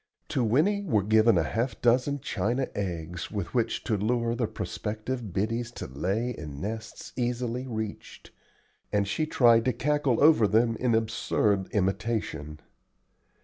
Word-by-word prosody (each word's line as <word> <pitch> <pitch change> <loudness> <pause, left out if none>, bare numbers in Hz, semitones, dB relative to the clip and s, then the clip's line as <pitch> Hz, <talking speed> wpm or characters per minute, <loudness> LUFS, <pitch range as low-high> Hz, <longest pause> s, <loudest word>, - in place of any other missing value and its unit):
To 125 - 0
Winnie 155 - +2
were 110 - +1
given 110 +1 +4
half 115 - 0
a - - -18
dozen 130 +4 +2
china 120 +7 -1
eggs 90 -3 -4
with 100 -5 -4
which 120 -3 0
to 110 - 0
lure 115 +3 0
the 120 -1 -1
prospective 110 +2 -4
biddies 115 +5 -1
to - - -6
lay 95 - -2
in 75 - -7
nests 110 +5 -6
easily 125 +1 -2
reached, 110 -3 -6 0.6
and 100 -1 +1
she 155 +9 -1
tried 120 -5 +5
to 130 - +2
cackle 140 0 +1
over 150 -9 +6
them 115 +2 +3
in 120 -3 +1
absurd 110 -3 +1
imitation. 95 -7 -2
115 Hz, 145 wpm, -28 LUFS, 100-125 Hz, 0.6 s, over